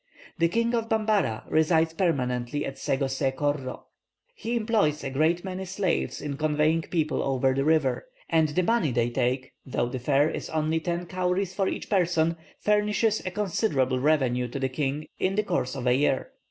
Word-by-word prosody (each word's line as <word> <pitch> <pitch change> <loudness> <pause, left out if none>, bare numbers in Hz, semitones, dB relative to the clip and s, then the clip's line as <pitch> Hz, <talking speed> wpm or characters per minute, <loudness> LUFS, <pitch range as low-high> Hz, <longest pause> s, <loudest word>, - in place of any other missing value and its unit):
The 170 - +4
king 230 +6 +1
of 230 -1 -1
Bambara 210 - +1
resides 160 +1 +2
permanently 140 -5 -1
at 135 - -6
Sego 135 +1 0
See 135 +1 0
Korro; 135 -1 -2 0.5
he 240 - -3
employs 215 -10 +1
a 135 - -3
great 160 +5 +1
many 190 0 -4
slaves 190 -1 -1
in 140 -2 -4
conveying 155 +2 +2
people 160 -2 -1
over 135 -1 +1
the 135 +1 0
river; 145 -5 +1 0.2
and 160 -2 +3
the 180 +5 +1
money 190 - +2
they 120 0 +1
take, 130 +2 -1
though 120 -2 -1
the 130 +1 -4
fare 140 +3 +3
is - - -5
only 155 +1 0
ten 170 +2 -2
cowries 185 +1 -1
for 195 0 0
each - - -3
person, 170 -4 +2 0.2
furnishes 210 +1 +1
a - - +1
considerable 170 - 0
revenue 130 -4 +2
to 120 - -6
the 135 -1 -1
king 145 +2 -2
in 190 +1 +1
the 215 - +2
course 170 -10 -1
of 130 -2 -5
a 125 - +4
year." 135 0 +1
155 Hz, 180 wpm, -26 LUFS, 135-185 Hz, 0.5 s, The